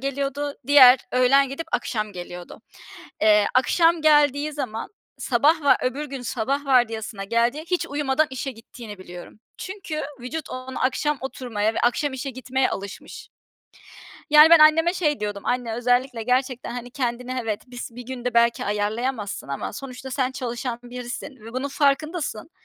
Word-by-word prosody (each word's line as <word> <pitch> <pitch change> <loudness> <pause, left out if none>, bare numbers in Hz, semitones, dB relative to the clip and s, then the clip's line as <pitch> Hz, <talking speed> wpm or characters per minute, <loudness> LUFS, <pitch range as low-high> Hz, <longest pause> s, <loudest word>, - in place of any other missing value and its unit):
geliyordu. 280 +1 -3
Diğer, 265 -3 +8
öğlen 260 +2 +4
gidip 320 +5 -6
akşam 215 -3 -2
geliyordu. 175 -1 -9 0.6
Eee, 210 -1 +5
akşam 330 +6 +3
geldiği 295 -1 +3
zaman, 240 -6 -5 0.3
sabah 295 +6 +2
va 285 - +5
öbür 270 +4 -2
gün 270 -2 -7
sabah 270 +5 -2
vardiyasına 225 -6 +1
geldiği, 235 +8 0
hiç 360 - +1
uyumadan 290 +1 0
işe 265 +1 -4
gittiğini 225 -2 -11
biliyorum. 180 +2 -11 0.2
Çünkü 375 -5 -5 0.2
vücut 300 +6 -6
ona, 255 0 -6
akşam 285 +3 0
oturmaya 225 -5 -2
ve - - -2
akşam 265 +4 +1
işe 265 +1 -4
gitmeye 260 +1 -1
alışmış. 195 0 -8 1.0
Yani, 300 +1 +8
ben 335 - +9
anneme 325 +3 +5
şey 300 - 0
diyordum: 205 -1 -4
"Anne 245 -2 -1
özellikle 245 0 0
gerçekten, 255 +1 -1
hani, 245 0 -7
kendini, 250 0 -3
evet, 215 -2 -3
bis 245 -1 -8
bir 245 +2 -9
günde 250 -2 -4
belki 235 0 +3
ayarlayamazsın 210 - -2
ama 140 - -4
sonuçta 265 +2 -8
sen 260 -1 0
çalışan 245 -2 -4
birisin 245 +2 -7
ve 230 - -10
bunun 260 +3 -3
farkındasın. 290 -1 -1
255 Hz, 150 wpm, -23 LUFS, 235-285 Hz, 1.0 s, ben